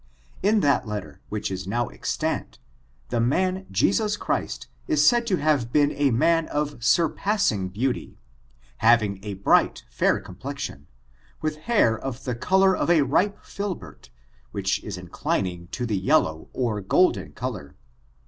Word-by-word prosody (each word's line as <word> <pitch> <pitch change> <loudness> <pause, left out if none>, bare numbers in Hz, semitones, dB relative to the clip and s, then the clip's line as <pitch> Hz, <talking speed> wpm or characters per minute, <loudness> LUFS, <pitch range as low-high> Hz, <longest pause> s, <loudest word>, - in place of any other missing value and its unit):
In 210 +2 +3
that 140 -6 +2
letter, 95 -9 -6
which 105 -2 -3
is 95 0 -5
now 120 +4 0
extant, 60 - -3 0.5
the 120 - 0
man 185 +10 +1
Jesus 210 +1 +1
Christ - - -2 0.2
is 310 -2 +3
said 240 -1 +4
to 195 - +2
have 145 -7 +1
been 145 +1 +3
a 145 -1 +1
man 165 +7 +2
of 145 -4 -3
surpassing 160 - +2
beauty, 120 +7 -2 0.6
having 110 -4 +3
a 105 -2 -5
bright 95 - +2
fair - - +2
com - - -12
plexion, 135 - -6 0.6
with 155 0 -1
hair 160 - +4
of 130 +2 -6
the 125 - -2
color 190 +9 +3
of - - -1
a 170 -3 +5
xi^jUhert^ 195 +5 -2 0.4
which 100 -1 -1
is 100 -4 -5
inclining 90 0 -3
to 125 +6 -4
the 105 -5 -1
yellow 95 - +1
or 115 -5 -1
golden 95 - +2
color. 105 - -6
125 Hz, 145 wpm, -25 LUFS, 100-170 Hz, 0.6 s, a